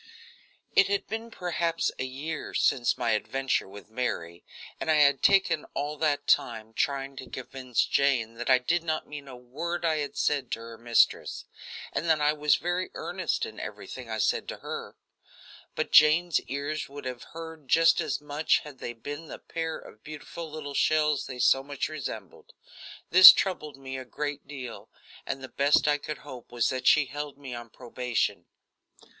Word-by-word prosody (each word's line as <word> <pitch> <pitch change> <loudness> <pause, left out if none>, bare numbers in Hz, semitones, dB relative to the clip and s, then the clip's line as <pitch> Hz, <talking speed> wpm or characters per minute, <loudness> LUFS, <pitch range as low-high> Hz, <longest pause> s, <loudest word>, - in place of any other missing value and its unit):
It 195 - +5
had 200 0 0
been 225 +2 -5
perhaps 170 -4 -1
a 130 - -1
year 145 +5 -5
since 120 -2 +2
my 115 - 0
adventure 135 +4 0
with 105 +2 -12
Mary, 85 -8 -3 0.4
and - - -4
I 155 - +5
had 140 -3 +4
taken 190 -6 +4
all 145 +1 -2
that 145 -2 0
time 110 -4 +1
trying 135 +2 -1
to 130 - -8
convince 130 -1 -2
Jane 130 -5 +1
that 120 +2 -5
I 130 - +7
did 165 +7 0
not 160 -2 -2
mean 145 -1 -9
a 130 - -9
word 155 +8 -4
I 160 -1 +2
had 145 -2 -4
said 140 -4 0
to - - -2
her 115 0 -10
mistress, 120 0 +2 0.5
and 170 - -1
that 160 -1 +4
I 150 0 +3
was 150 -1 +3
very 175 +1 -2
earnest - - -2
in - - -9
everything 125 -3 -8
I 110 - -3
said 110 - 0
to - - -5
her. - - -7 0.8
But - - -2
Jane's 160 +3 +6
ears 145 +2 -3
would 140 0 -9
have 125 -2 -5 0.2
heard 160 -3 -9
just 165 +4 +5
as 155 -4 -2
much 150 +1 +1
had 145 -4 -12
they 120 - -5
been 145 +7 -7
the - - -8
pair 165 -1 -4
of 110 - -15
beautiful 155 +2 -8
little 150 -2 -7
shells 150 0 +2
they 130 - -7
so 135 +2 +4
much 140 +1 -4
resembled. 120 - -7 0.6
This 185 +1 +13
troubled 155 -7 -2
me 135 -1 -6
a 130 - -8
great 145 +2 -5
deal, 130 -5 -8 0.4
and 135 - -4
the - - -5
best 140 +3 +3
I 150 0 +3
could 150 +1 -5
hope 130 -5 -10
was 120 -1 +1
that 130 -1 -2
she 150 -2 +6
held 145 +2 -6
me 135 -3 -8
on 120 -1 -7
probation. 125 0 -2
145 Hz, 180 wpm, -28 LUFS, 125-155 Hz, 0.8 s, This